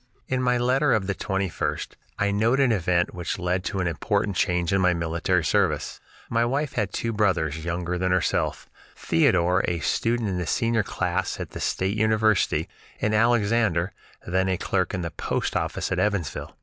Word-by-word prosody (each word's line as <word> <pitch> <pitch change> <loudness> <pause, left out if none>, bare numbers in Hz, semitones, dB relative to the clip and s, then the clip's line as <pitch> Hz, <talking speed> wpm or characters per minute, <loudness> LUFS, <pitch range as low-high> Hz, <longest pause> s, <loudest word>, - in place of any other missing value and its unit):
In 130 -1 0
my 125 -1 +2
letter 130 +3 +2
of 110 -3 +1
the 100 - -1
21st 95 -2 -2 0.3
I 100 0 +1
note 115 +6 +2
an 135 -3 +4
event 90 -4 +1
which 90 +3 -3
led 90 0 -1
to 95 - -2
an - - -1
important 85 +4 -1
change 90 -2 +1
in 95 - +3
my 90 -1 +3
military 85 +2 0
service. - - 0 0.3
My 115 0 +1
wife 135 +3 -1
had 105 -5 -1
two 115 +2 -2
brothers, 85 -7 0
younger 90 +1 -2
than 95 0 0
herself, 80 -6 0 0.3
Theodore, 90 +2 +2
a 90 - 0
student 115 +3 0
in 90 -2 -2
the 90 - -3
senior 115 +3 +1
class 95 -1 -2
at - - -6
the - - -7
State 95 +2 -1
University, 110 -1 +2 0.3
and 110 - 0
Alexander, 110 -5 +2 0.3
then 95 +2 +1
a 95 - +1
clerk 95 +1 -1
in 90 - -3
the 85 - -4
post - - -2
office - - -2
at - - 0
Evansville. 100 -8 -2
95 Hz, 180 wpm, -25 LUFS, 90-110 Hz, 0.3 s, an